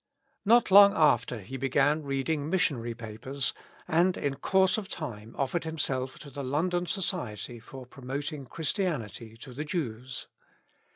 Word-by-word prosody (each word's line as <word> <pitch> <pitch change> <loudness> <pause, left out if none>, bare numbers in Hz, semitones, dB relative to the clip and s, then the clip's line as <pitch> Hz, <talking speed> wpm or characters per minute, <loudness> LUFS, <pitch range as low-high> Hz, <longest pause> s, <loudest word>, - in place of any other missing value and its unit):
Not 235 0 +5
long 200 +1 +9
after 120 -7 +3
he 130 +8 -7
began 140 +3 +2
reading 140 +2 -1
missionary 125 -10 0
papers, 120 +4 -2 0.3
and 175 +2 +3
in 140 -1 -1
course 190 +2 +3
of 200 - -8
time 115 -8 -6
oSered 140 +5 0
himself 135 -5 -2
to 145 - -10
the 140 - -5
IvOndon 175 +7 0
Society 125 - -3
for 130 +3 -10
promoting 135 +3 -5
Christianity 120 - -3
to 125 +2 -10
the 145 +5 -4
Jews. 130 -5 -4
140 Hz, 135 wpm, -29 LUFS, 125-165 Hz, 0.3 s, long